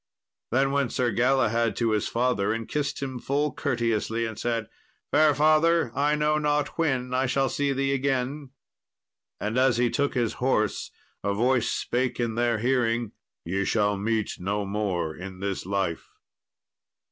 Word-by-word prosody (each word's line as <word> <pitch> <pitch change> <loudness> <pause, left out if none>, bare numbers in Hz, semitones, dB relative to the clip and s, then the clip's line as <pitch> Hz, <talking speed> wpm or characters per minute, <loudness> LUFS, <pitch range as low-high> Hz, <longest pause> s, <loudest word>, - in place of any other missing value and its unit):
Then 135 +3 +2
went 140 -4 0
Sir 125 -2 0
Galahad 120 -2 +2
to 115 -2 +1
his 105 -1 0
father 115 -4 +1
and 115 0 -4
kissed 145 -1 -2
him 130 -2 -4
full 145 +4 0
courteously, 115 -4 -1
and 110 -1 -6
said, 115 -2 -1 0.4
"Fair 155 -2 +5
father, 155 -1 +3
I 145 +2 +2
know 150 0 +1
not 150 -1 +1
when 130 -6 -1
I 130 +1 +1
shall 135 +1 +1
see 145 -1 0
thee 135 0 0
again." 135 +1 -1 0.9
And 110 +4 -1
as 130 -3 +3
he 120 -1 +2
took 140 -1 0
his 120 -3 0
horse 115 -5 +1 0.3
a 100 0 0
voice 125 +2 +2
spake 125 0 -1
in 120 -2 0
their 120 0 +1
hearing, 120 -2 +1 0.3
"Ye 95 +4 -1
shall 105 0 +1
meet 110 +2 -1
no 100 +3 -2
more 95 -6 -2
in 95 0 -8
this 100 -2 -3
life." 95 -4 -2
120 Hz, 160 wpm, -26 LUFS, 110-135 Hz, 0.9 s, Fair